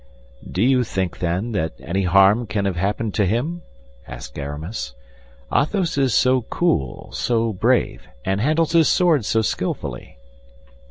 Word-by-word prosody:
"Do 95 - 0
you 130 0 +4
think, 95 -6 -3
then, 90 +7 -1
that 80 -7 -1
any 95 +2 -2
harm 100 +5 +4
can 100 0 -1
have 95 -3 -1
happened 100 +4 -1
to 105 - +2
him?" 145 - -1 0.5
asked - - -8
Aramis. 75 - -5 0.6
"Athos 175 +3 +1
is 135 -2 +2
so 130 0 +4
cool, 80 - -1
so 115 -2 0
brave, 90 - 0 0.2
and 95 +1 0
handles 155 +5 +2
his 165 -2 +5
sword 165 - +3
so 110 +2 +1
skillfully." - - -4
110 Hz, 145 wpm, -21 LUFS, 95-130 Hz, 0.6 s, his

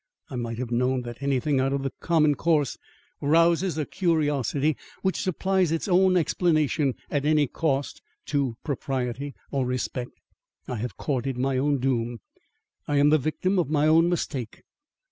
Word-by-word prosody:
I - - -5
might 115 -2 -3
have 125 -1 -4
known 125 +1 +1
that 120 +1 -8
anything 140 0 +1
out 135 +1 +1
of 140 -1 -1
the 135 - -3
common 155 -3 +3
course 150 -2 +1 0.5
rouses 165 +3 +3
a 155 - -1
curiosity 150 - 0 0.3
which 190 -1 0
supplies 185 -1 +1
its 165 +4 -1
own 185 0 +4
explanation 155 -5 +1 0.2
at 145 -1 0
any 150 0 +3
cost 140 0 -2 0.2
to 135 -6 -1
propriety 135 -1 -3 0.2
or 140 -2 0
respect. 125 0 -3 0.5
I 125 - -3
have 120 +3 -5
courted 135 -2 -2
my 130 +1 0
own 145 +1 +2
doom. 120 -2 -1 0.7
I 145 - +1
am 145 +1 +5
the 155 - +5
victim 180 +7 0
of 165 - 0
my 150 -1 +2
own 165 +2 +5
mistake. 135 -9 -3
145 Hz, 160 wpm, -26 LUFS, 130-160 Hz, 0.7 s, am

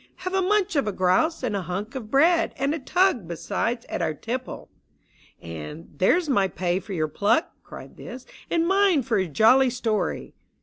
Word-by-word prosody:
Have 370 - -2
a 385 - +2
munch 400 -1 +1
of 215 -9 0
grouse 225 - +1
and 225 -5 -1
a 200 - -1
hunk 195 +5 -5
of 245 -6 -7
bread, 330 +6 +3
And 275 +2 0
a 320 - -3
tug, 325 - +1
besides, 230 +7 -3
at - - -4
our 155 - -1
tipple! 250 - -6 0.4
" - - -31
And 85 - -8
" - - -24
There's 325 - +3
my 200 -9 +2
pay 180 0 -1
for 195 +1 -8
your 155 -3 0
pluck! 210 - +1
" - - -45
cried - - -12
This, 250 +1 -9
" - - -23
And 335 0 +1
mine 385 -6 +3
for 230 -4 0
your 185 -2 -1
jolly 250 - +5
story 230 -4 -2
240 Hz, 205 wpm, -24 LUFS, -, 0.4 s, jolly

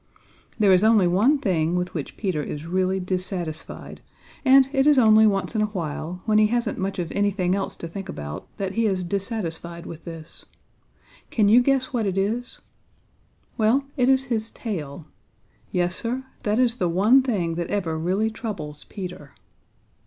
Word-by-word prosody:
There 205 -4 +5
is 185 +2 +4
only 220 -3 +5
one 210 +12 +3
thing 175 - 0
with 180 0 -2
which 155 -5 -5
Peter 185 -8 -1
is 150 +1 -6
really 185 +2 0
dissatisfied, 180 -3 -5 0.4
and 265 -1 +6
it 270 0 +3
is 295 -2 +6
only 220 -2 +6
once 195 +2 0
in 215 - +2
a 215 - +2
while, 175 -2 -5
when 215 -1 +3
he 215 - +5
hasn't 235 -1 -1
much 195 +1 -2
of 175 -3 -3
anything 200 -3 +1
else 195 0 -2
to 170 - -7
think 195 +3 -7
about, 75 0 -6
that 195 -1 -3
he 230 +1 +1
is 190 -3 0
dissatisfied 175 -3 -4
with 165 -1 -9
this. 165 -2 -10 0.9
Can 210 -3 +2
you 235 +4 +7
guess 270 +1 +1
what 225 -4 0
it 190 0 -2
is? 225 +6 -2 1.0
Well, 225 +6 +3
it 250 -2 +2
is 265 0 +4
his 230 -4 -2
tail. 160 - -6 0.7
Yes, 175 0 0
Sir, 245 +3 -2 0.2
that 210 +1 0
is 245 -1 +2
the 180 -7 0
one 210 +10 +5
thing 195 -10 -1
that 170 0 -3
ever 175 -6 -1
really 190 +7 0
troubles 190 -10 -6
Peter. 180 -8 -8
195 Hz, 175 wpm, -24 LUFS, 175-225 Hz, 1.0 s, you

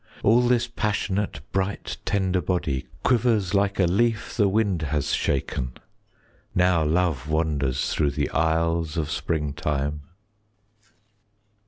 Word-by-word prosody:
All 115 +3 +5
this 120 -1 +2
passionate 105 - -2
bright 95 +1 -2
tender 95 -2 +1
body 75 -9 -1 0.2
Quivers 115 -6 +2
like 100 0 +1
a 95 - +5
leaf 110 +5 +1
the 105 -3 +3
wind 100 -4 +1
has 75 -2 -1
shaken, 65 -2 -1 0.8
Now 90 -2 +3
love 80 -3 0
wanders 75 -5 0
through 75 -2 +2
the - - -1
aisles 80 0 +1
of 75 -2 -1
springtime. 75 -2 -2
85 Hz, 115 wpm, -25 LUFS, 75-100 Hz, 0.8 s, All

